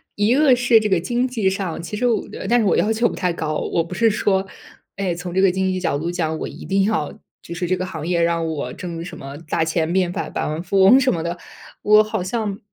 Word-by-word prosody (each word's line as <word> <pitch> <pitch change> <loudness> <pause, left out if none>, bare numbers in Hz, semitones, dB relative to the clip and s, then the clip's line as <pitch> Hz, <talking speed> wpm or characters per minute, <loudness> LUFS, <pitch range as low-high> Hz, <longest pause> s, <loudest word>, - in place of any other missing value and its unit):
一 210 +5 +2
个 280 -4 +5
是 240 -2 +4
这 215 - -1
个 190 -4 +2
经 240 +7 -1
济 225 -7 0
上， 190 -4 -3
其 210 +5 -6
实 245 - -1
我 230 -3 0
的 - - -7
但 240 +1 +3
是 220 - +1
我 195 - +3
要 220 +2 +2
求 235 +2 +2
不 - - -6
太 180 -1 -1
高。 155 -2 -3 0.2
我 165 - +2
不 170 +2 -9
是 230 +2 +3
说， 195 -2 +1 0.5
哎 195 -3 -1
从 175 0 -6
这 190 - +2
个 195 - +5
经 190 +1 0
济 185 - -2
角 175 - -1
度 165 +4 -3
讲 160 -3 -2
我 - - -3
一 - - -10
定 195 0 +1
要 195 -8 0 0.3
就 170 - -8
是 175 0 -2
这 185 - +1
个 185 0 -3
行 160 -4 -6
业 175 -1 +1
让 170 -1 +1
我 145 -6 -4
挣 170 -2 -6
什 175 - -8
么 140 +1 -8
大 - - +1
钱 160 0 -1
变 180 -1 +1
百 - - -4
百 - - -3
万 155 +2 -3
富 195 +2 +1
翁 245 +8 +7
什 260 -1 +2
么 165 -1 -3
的， 170 +1 -3 0.4
我 210 +1 +6
好 215 -3 -3
像 205 0 -3
185 Hz, 290 characters per minute, -21 LUFS, 170-215 Hz, 0.5 s, 翁